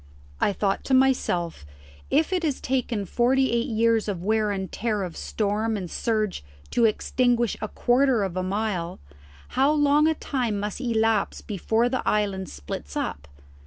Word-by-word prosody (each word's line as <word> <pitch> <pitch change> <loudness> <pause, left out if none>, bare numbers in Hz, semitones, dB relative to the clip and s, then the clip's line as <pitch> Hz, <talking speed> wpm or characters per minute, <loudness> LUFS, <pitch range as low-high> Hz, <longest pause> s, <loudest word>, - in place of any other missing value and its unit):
I - - +2
thought 195 0 -1
to 265 - +3
myself 245 - +1 0.5
if 315 +5 +2
it 365 - +1
has 300 -5 -1
taken 245 -5 -1
forty 260 +6 +2
eight 235 +2 +1
years 230 -2 +2
of 195 -4 -2
the - - -8
wear 215 0 +2
and 190 -3 -3
tear 215 -3 -1
of 175 -3 -6
storm 215 +1 -1
and 180 -4 -6
surge 215 - -1 0.3
to 235 - +3
extinguish 240 +1 +1
a 215 - -2
quarter 245 -1 +2
of 190 -3 -3
a 185 - 0
mile, 185 -2 -2 0.5
how 270 +3 +3
long 295 0 +4
a 320 - +2
time 245 -9 -2
must 210 +4 -4
elapse 225 -4 +1
before 220 +3 0
this 255 +1 -1
island 195 -3 0
splits 70 0 -7
up? 70 0 -3
220 Hz, 165 wpm, -25 LUFS, 200-255 Hz, 0.5 s, long